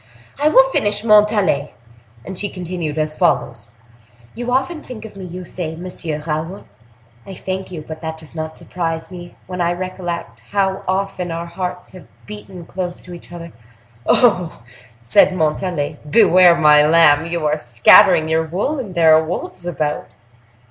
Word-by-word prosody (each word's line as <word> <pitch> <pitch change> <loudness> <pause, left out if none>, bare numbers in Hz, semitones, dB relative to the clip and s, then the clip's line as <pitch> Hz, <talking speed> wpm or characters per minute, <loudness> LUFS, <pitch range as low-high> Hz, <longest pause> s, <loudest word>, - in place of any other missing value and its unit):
"I 295 - +4
will 265 -3 +6
finish, 205 -2 0
Montalais," 210 -9 +3 0.5
and 190 - -7
she 205 +3 -2
continued 175 -4 -5
as 155 0 -1
follows: 115 - 0 0.6
"You 245 +1 -4
often 270 +5 -1
think 225 -6 -10
of 215 - -11
me, 190 -1 -8
you 180 +1 -8
say, 165 -2 -5
Monsieur 170 -3 -5
Raoul: 160 +4 -4 0.6
I 195 - -10
thank 190 +1 -5
you; 160 -4 -7
but 155 0 -8
that 160 -1 -5
does 160 -1 -12
not 160 0 -5
surprise 165 -1 -4
me, 175 -1 -10
when 180 -1 -5
I 170 0 +1
recollect 175 -1 -6
how 195 -1 0
often 190 -1 -2
our 165 +1 -4
hearts 180 +1 -6
have 185 -2 -14 0.2
beaten 195 -4 -10
close 180 -1 -5
to 180 - -11
each 170 0 -12
other." 170 -1 -9 0.5
"Oh! - - +4
oh!" 180 - +1 0.4
said 115 +10 +3
Montalais. 160 -1 -2
"Beware, 180 -1 +6
my 150 -2 +6
lamb! 155 -1 +5
You 170 -2 -3
are 150 0 0
scattering 155 - +5
your 160 0 0
wool, 205 - -2
and 200 -8 -7
there 160 -2 +6
are 160 - +3
wolves 175 +1 -5
about." 150 -3 -2
175 Hz, 165 wpm, -18 LUFS, 160-190 Hz, 0.6 s, will